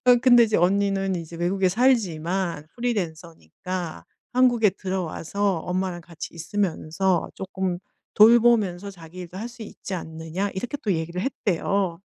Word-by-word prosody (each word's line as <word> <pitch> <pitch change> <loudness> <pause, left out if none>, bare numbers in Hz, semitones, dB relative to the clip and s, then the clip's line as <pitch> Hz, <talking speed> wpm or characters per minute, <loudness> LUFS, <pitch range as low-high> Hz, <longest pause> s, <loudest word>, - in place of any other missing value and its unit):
어 245 - +8
근데 245 -2 +7
이제 220 -1 +1
"언니는 195 +1 +2
이제 165 0 -7
외국에 185 +2 +1
살지만 180 - +1
프리랜서니까 170 - -4 0.3
한국에 245 -4 +4
들어와서 190 0 -2
엄마랑 180 0 -2
같이 165 -1 -8
있으면서 175 0 -1
쪼끔 190 -2 -3 0.4
돌보면서 215 -4 +5
자기 170 -1 -13
일도 180 +1 -9
할 230 +3 -4
수 235 -1 -11
있지 200 - -7
않느냐." 165 +3 -4
이렇게 245 +9 -3
또 205 - +1
얘기를 170 +2 -3
했대요. 195 -6 -1
190 Hz, 320 characters per minute, -24 LUFS, 170-205 Hz, 0.4 s, 어